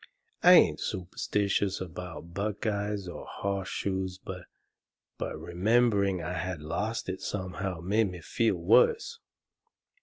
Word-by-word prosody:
I 180 Hz, -, +9 dB
ain't 180 Hz, -, +6 dB
superstitious 100 Hz, +1 st, -1 dB
about 90 Hz, -1 st, -7 dB
buckeyes 105 Hz, 0 st, -2 dB
or 85 Hz, -, -7 dB
horse 100 Hz, -1 st, -3 dB
shoes, 95 Hz, -1 st, -2 dB
but 90 Hz, -2 st, -8 dB, 0.7 s
remembering 100 Hz, 0 st, +1 dB
I 90 Hz, +3 st, -3 dB
had 90 Hz, -1 st, -3 dB
lost 100 Hz, +9 st, -3 dB
it 95 Hz, 0 st, -4 dB
somehow 95 Hz, -2 st, -3 dB
made 100 Hz, +4 st, +2 dB
me 90 Hz, -2 st, -8 dB
feel 110 Hz, +5 st, +1 dB
worse. 450 Hz, -, +3 dB
95 Hz, 115 wpm, -29 LUFS, 90-105 Hz, 0.7 s, I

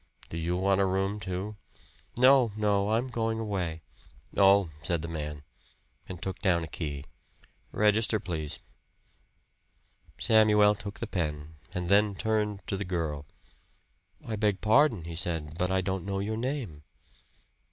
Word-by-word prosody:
"Do 80 Hz, -, -4 dB
you 85 Hz, +2 st, -1 dB
want 95 Hz, +1 st, +2 dB
a -, -, +4 dB
room, 95 Hz, +2 st, 0 dB
too?" 95 Hz, +2 st, -4 dB, 0.6 s
"No, 130 Hz, -2 st, +6 dB
no, 100 Hz, -1 st, +2 dB
I'm 115 Hz, +3 st, +1 dB
going 115 Hz, -2 st, -1 dB
away." 90 Hz, -7 st, -3 dB, 0.5 s
"Oh!" 100 Hz, -3 st, +5 dB
said 85 Hz, 0 st, -1 dB
the -, -, -4 dB
man, 75 Hz, -3 st, -5 dB, 0.7 s
and 90 Hz, -2 st, -6 dB
took 95 Hz, 0 st, -5 dB
down 90 Hz, -5 st, +2 dB
a -, -, -5 dB
key. 75 Hz, -3 st, -5 dB, 0.7 s
"Register, 105 Hz, +1 st, +2 dB
please." 80 Hz, -6 st, -4 dB, 1.6 s
Samuel 105 Hz, -2 st, +5 dB
took 100 Hz, 0 st, -8 dB
the -, -, -1 dB
pen, 80 Hz, -6 st, -4 dB, 0.2 s
and 90 Hz, -1 st, -2 dB
then 100 Hz, +1 st, +4 dB
turned 105 Hz, -2 st, -1 dB
to 100 Hz, -, -2 dB
the 100 Hz, -, -2 dB
girl. 80 Hz, -6 st, -3 dB, 1.0 s
"I 110 Hz, -2 st, -3 dB
beg 105 Hz, -2 st, +1 dB
pardon," 110 Hz, -, +4 dB
he 85 Hz, +1 st, -7 dB
said, 80 Hz, -2 st, -3 dB
"but 90 Hz, -, +1 dB
I 95 Hz, 0 st, +2 dB
don't 95 Hz, -1 st, -2 dB
know 100 Hz, -1 st, -1 dB
your 105 Hz, +3 st, -2 dB
name." 115 Hz, -, -3 dB
95 Hz, 145 wpm, -29 LUFS, 85-105 Hz, 1.6 s, No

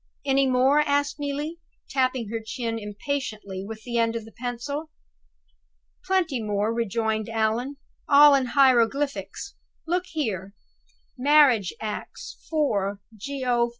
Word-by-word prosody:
Any 275 Hz, 0 st, +3 dB
more?" 260 Hz, +3 st, +4 dB
asked 285 Hz, 0 st, +1 dB
Neelie, 290 Hz, +3 st, -3 dB, 0.3 s
tapping 255 Hz, -4 st, 0 dB
her 225 Hz, +1 st, -2 dB
chin 230 Hz, 0 st, -3 dB
impatiently 210 Hz, -3 st, -4 dB
with 220 Hz, +2 st, -8 dB
the 235 Hz, -1 st, -1 dB
end 230 Hz, 0 st, +1 dB
of 225 Hz, -2 st, -4 dB
the 225 Hz, -, -13 dB
pencil. 250 Hz, +6 st, -5 dB, 1.1 s
"Plenty 345 Hz, -10 st, 0 dB
more," 210 Hz, +1 st, 0 dB
rejoined 220 Hz, -1 st, -1 dB
Allan; 225 Hz, +5 st, -1 dB, 0.3 s
"all 290 Hz, 0 st, +8 dB
in 270 Hz, -2 st, +2 dB
hieroglyphics. 265 Hz, -, +2 dB, 0.3 s
Look 360 Hz, +2 st, -1 dB
here: 210 Hz, -, -3 dB, 0.6 s
'Marriage 265 Hz, -8 st, +5 dB
Acts, 215 Hz, -1 st, -7 dB
4 205 Hz, -11 st, 0 dB, 0.2 s
Geo. 245 Hz, 0 st, 0 dB
245 Hz, 115 wpm, -25 LUFS, 220-285 Hz, 1.1 s, all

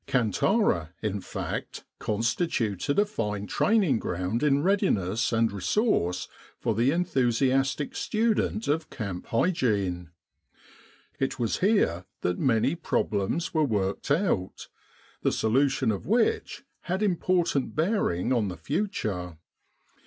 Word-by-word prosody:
Kantara, 115 Hz, -, +1 dB
in 105 Hz, -2 st, -1 dB
fact, -, -, -5 dB, 0.2 s
constituted 115 Hz, -, -1 dB
a 205 Hz, -, +5 dB
fine 105 Hz, -, -3 dB
training 190 Hz, -, +2 dB
ground 90 Hz, +6 st, -2 dB
in 145 Hz, -1 st, +3 dB
readiness 120 Hz, -, +1 dB
and 115 Hz, 0 st, +2 dB
resource 100 Hz, -, 0 dB, 0.3 s
for 115 Hz, -, -1 dB
the 115 Hz, +5 st, +2 dB
enthusiastic 135 Hz, -3 st, +1 dB
student 220 Hz, 0 st, 0 dB
of 155 Hz, +2 st, 0 dB
camp 100 Hz, -7 st, -5 dB
hygiene. 105 Hz, -, 0 dB, 1.1 s
It 135 Hz, -, -1 dB
was 115 Hz, -3 st, -1 dB
here 185 Hz, -, +2 dB, 0.2 s
that 90 Hz, 0 st, -1 dB
many 125 Hz, +1 st, +2 dB
problems 110 Hz, -, -1 dB
were 160 Hz, -2 st, +3 dB
worked 100 Hz, -6 st, -1 dB
out, 145 Hz, -, 0 dB, 0.5 s
the -, -, +2 dB
solution 130 Hz, +2 st, +2 dB
of 100 Hz, +4 st, -5 dB
which 430 Hz, -, +1 dB, 0.3 s
had 190 Hz, +4 st, 0 dB
important 175 Hz, -6 st, +1 dB
bearing 155 Hz, -, +1 dB
on 115 Hz, -4 st, +1 dB
the 90 Hz, -2 st, -5 dB
future. 95 Hz, -, -3 dB
125 Hz, 115 wpm, -27 LUFS, -, 1.1 s, a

